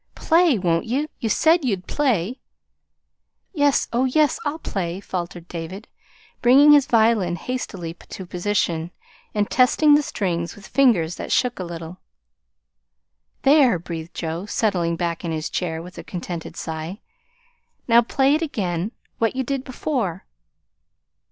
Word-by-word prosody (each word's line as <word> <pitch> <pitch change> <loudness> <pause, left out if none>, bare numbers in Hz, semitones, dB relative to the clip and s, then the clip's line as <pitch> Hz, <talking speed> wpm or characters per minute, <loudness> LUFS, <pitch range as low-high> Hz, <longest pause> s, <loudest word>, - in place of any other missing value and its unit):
"Play, 330 -5 +3
won't 170 -3 0
ye? 275 +6 0
You 225 - -2
SAID 325 - +3
you'd 195 -8 -1
play!" 250 - 0 1.1
"Yes, 290 -4 +2
oh, 245 +3 +2
yes, 295 +2 +2
I'll 295 +1 -2
play," 185 - -4
faltered 175 -3 -5
David, 175 +5 -7 0.5
bringing 275 +5 +7
his 290 -2 +6
violin 220 -6 +3
hastily 180 -5 -5
to 185 +2 -10
position, 175 -3 -1 0.5
and 205 -1 +1
testing 290 +4 +4
the 295 - +6
strings 170 - -3
with 205 - -13
fingers 190 -13 +2
that - - -6
shook 250 -4 +1
a - - -2
little. 170 0 -8 1.4
"There!" 270 - +5
breathed 165 -1 -7
Joe, 165 +4 -4
settling 180 -6 0
back 170 0 -3
in 170 - -2
his 155 -1 -3
chair 165 -2 -2
with 180 +1 -11
a - - -7
contented 175 -2 -6
sigh. 160 +4 -5 0.9
"Now, 235 0 +6
play 270 +4 +2
it 310 - +1
again 195 - -2 0.3
what 225 +2 +1
you 265 - 0
did 270 +1 -2
before." 245 - -3
200 Hz, 140 wpm, -22 LUFS, 170-260 Hz, 1.4 s, bringing